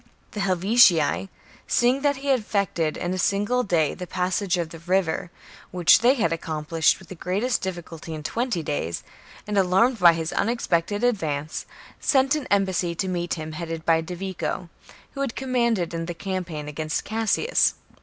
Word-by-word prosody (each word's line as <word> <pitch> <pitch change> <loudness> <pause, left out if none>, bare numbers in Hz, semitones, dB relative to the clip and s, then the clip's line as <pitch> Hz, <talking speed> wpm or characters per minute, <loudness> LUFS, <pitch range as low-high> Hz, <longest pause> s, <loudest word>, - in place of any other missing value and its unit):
The 210 - -6
Helvetii, 190 -2 +4 0.4
seeing 250 +3 +2
that 285 0 +2
he 275 +1 -5
had 265 -2 +4
effected 200 -7 -1
in 175 +1 -2
a 185 - -3
single 205 +7 +1
day 170 -9 +1
the 180 -1 -7
passage 185 +1 0
of 170 -2 -2
the 165 - -10
river, 180 0 0 0.4
which 180 -2 +5
they 245 +4 +4
had 170 - +1
accomplished 160 0 0
with 190 - -16
the - - -6
greatest 200 +8 -1
difficulty 170 -3 -6
in 155 - -7
twenty 230 0 -2
days, 85 - -3 0.4
and 210 -1 0
alarmed 195 +6 +3
by 175 -2 +7
his 165 0 -3
unexpected 205 -2 0
advance, 155 -11 -1 0.3
sent 270 -1 +3
an 300 -3 -2
embassy 190 -4 +1
to 190 - -2
meet 175 -2 -2
him, 155 -1 -6
headed 165 0 -5
by 165 -1 +4
Divico, 180 0 -4 0.4
who 275 - -6
had 270 -4 -2
commanded 235 -9 0
in 165 0 -3
the 175 - -4
campaign 175 -5 -4
against 155 +1 -3
Cassius. 225 - +2
185 Hz, 165 wpm, -24 LUFS, 165-220 Hz, 0.4 s, by